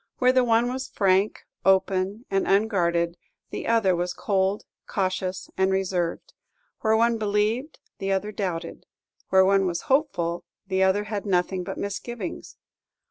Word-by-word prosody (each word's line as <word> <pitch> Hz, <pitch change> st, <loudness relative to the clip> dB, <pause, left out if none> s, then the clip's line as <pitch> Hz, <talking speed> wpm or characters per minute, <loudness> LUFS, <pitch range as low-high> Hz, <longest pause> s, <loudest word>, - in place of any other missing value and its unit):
Where 255 Hz, 0 st, +4 dB
the 255 Hz, -1 st, +4 dB
one 230 Hz, 0 st, +3 dB
was 260 Hz, 0 st, -4 dB
frank, 195 Hz, -1 st, +1 dB, 0.2 s
open, 195 Hz, +3 st, +2 dB
and 195 Hz, 0 st, +1 dB
unguarded, 175 Hz, -5 st, +2 dB, 0.3 s
the -, -, -5 dB
other 225 Hz, -5 st, +3 dB
was 175 Hz, +1 st, -2 dB
cold, 195 Hz, 0 st, 0 dB, 0.2 s
cautious, 185 Hz, -1 st, -2 dB
and 190 Hz, 0 st, +2 dB
reserved; 185 Hz, -3 st, -1 dB, 0.5 s
where 220 Hz, 0 st, +2 dB
one 230 Hz, 0 st, +2 dB
believed, 215 Hz, +7 st, 0 dB, 0.2 s
the 195 Hz, 0 st, -1 dB
other 195 Hz, +2 st, 0 dB
doubted; 175 Hz, -5 st, -4 dB, 0.4 s
where 190 Hz, 0 st, +5 dB
one 195 Hz, 0 st, +3 dB
was 170 Hz, -1 st, -2 dB
hopeful, 260 Hz, -, 0 dB, 0.2 s
the 190 Hz, 0 st, 0 dB
other 190 Hz, +2 st, +3 dB
had 210 Hz, -1 st, -4 dB
nothing 180 Hz, 0 st, +1 dB
but -, -, -6 dB
misgivings. 200 Hz, 0 st, -5 dB
195 Hz, 140 wpm, -25 LUFS, 185-220 Hz, 0.5 s, where